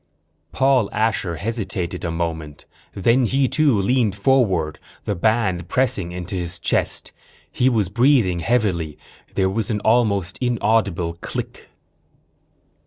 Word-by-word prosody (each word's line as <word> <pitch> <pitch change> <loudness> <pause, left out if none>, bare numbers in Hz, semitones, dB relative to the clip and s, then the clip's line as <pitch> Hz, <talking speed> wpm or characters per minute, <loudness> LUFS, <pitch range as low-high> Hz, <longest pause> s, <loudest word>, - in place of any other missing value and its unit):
_Paul 130 -5 +2
Asher 105 -5 0
hesitated 100 -3 -3
a 85 - -1
moment. 80 -3 -4 0.3
Then 115 +5 +3
he 135 +3 +2
too 145 -6 +2
leaned 110 0 +1
forward, 100 - +1 0.3
the 105 - 0
band 95 -3 0
pressing 100 -9 0
into 90 +2 -6
his 90 -1 -2
chest. - - -1 0.4
He 125 - +2
was 110 -6 +1
breathing 115 -4 +3
heavily. 85 -6 0 0.4
There 95 - +2
was 100 +2 -1
an 105 -2 0
almost 100 -6 +1
inaudible 105 -8 0
click. - - -6
100 Hz, 120 wpm, -21 LUFS, 85-120 Hz, 0.4 s, Then